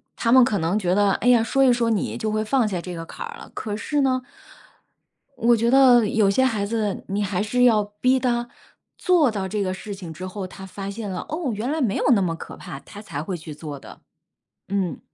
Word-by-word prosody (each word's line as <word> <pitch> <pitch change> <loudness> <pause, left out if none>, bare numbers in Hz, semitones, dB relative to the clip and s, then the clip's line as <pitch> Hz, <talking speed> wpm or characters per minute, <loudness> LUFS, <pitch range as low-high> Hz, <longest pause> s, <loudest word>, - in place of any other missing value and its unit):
他 230 - 0
们 260 +1 +8
可 215 - 0
能 170 +6 0
觉 180 -2 +1
得， 205 -1 +3
哎 - - -1
呀， 240 -2 +5
说 270 +4 +2
一 255 - +6
说 235 -1 +1
你 220 -4 -1
就 220 -2 -2
会 215 0 0
放 250 -1 +2
下 190 -4 -2
这 180 0 -7
个 165 - -6
坎 325 - -7
儿 465 0 -9
了。 - - -12
可 210 -2 -4
是 290 +7 -1
呢， 255 -1 +1 1.1
我 240 0 +3
觉 230 +2 +1
得 250 -3 +6
有 210 -1 +2
些 260 +7 +3
孩 215 -5 0
子 210 -2 -2
你 200 +2 -1
还 190 0 -1
是 245 +4 +1
要 220 -4 +5
逼 210 +6 +1
他 240 -1 0 0.5
做 345 -7 +3
到 200 -4 -3
这 210 +1 -2
个 185 -1 -1
事 205 +2 -7
情 180 -5 -8
之 185 +4 -7
后， 185 0 -5
他 190 +1 -10
发 195 +1 -7
现 205 0 -5
了， 180 - -5
哦， 310 -4 -2
原 215 +5 -3
来 310 +2 -1
没 220 -6 +1
有 - - -1
那 200 - +2
么 170 -3 0
可 - - -9
怕， 135 - -9
他 205 +8 -12
才 145 -8 -5
会 180 +3 -4
去 155 -2 -8
做 150 -1 -7
的， - - -13 0.7
嗯。 195 -3 -2
210 Hz, 260 characters per minute, -23 LUFS, 190-245 Hz, 1.1 s, 们